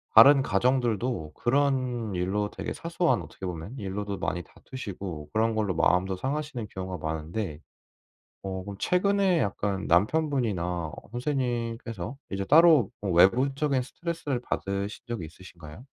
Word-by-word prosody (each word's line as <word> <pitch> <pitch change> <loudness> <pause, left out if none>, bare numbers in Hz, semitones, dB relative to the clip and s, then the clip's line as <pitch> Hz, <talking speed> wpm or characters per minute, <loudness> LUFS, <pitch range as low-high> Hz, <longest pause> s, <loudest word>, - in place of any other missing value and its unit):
다른 135 +5 +9
가정들도 120 - 0
그런 125 -4 +1
일로 100 +4 -1
되게 - - -4
사소한 170 0 0
어떻게 95 - -9
보면 90 +8 -6
일로도 100 0 -4
많이 90 0 -2
다투시고 95 - -7
그런 110 +1 +2
걸로 105 -3 0
마음도 90 +3 +2
상하시는 135 0 -3
경우가 95 -3 -6
많은데. 80 +2 -3 0.9
어 95 -1 -4
그럼 100 0 -7
최근에 190 -1 +2
약간 100 -1 -2
남편분이나 95 - +1 0.2
선생님께서 120 - -2 0.2
이제 95 0 -2
따로 155 - +6
뭐 100 - -2
외부적인 130 - +3
스트레스를 150 -1 -3
받으신 100 -3 -3
적이 115 -8 -4
있으신가요? 85 +3 -13
110 Hz, 330 characters per minute, -27 LUFS, 95-130 Hz, 0.9 s, 다른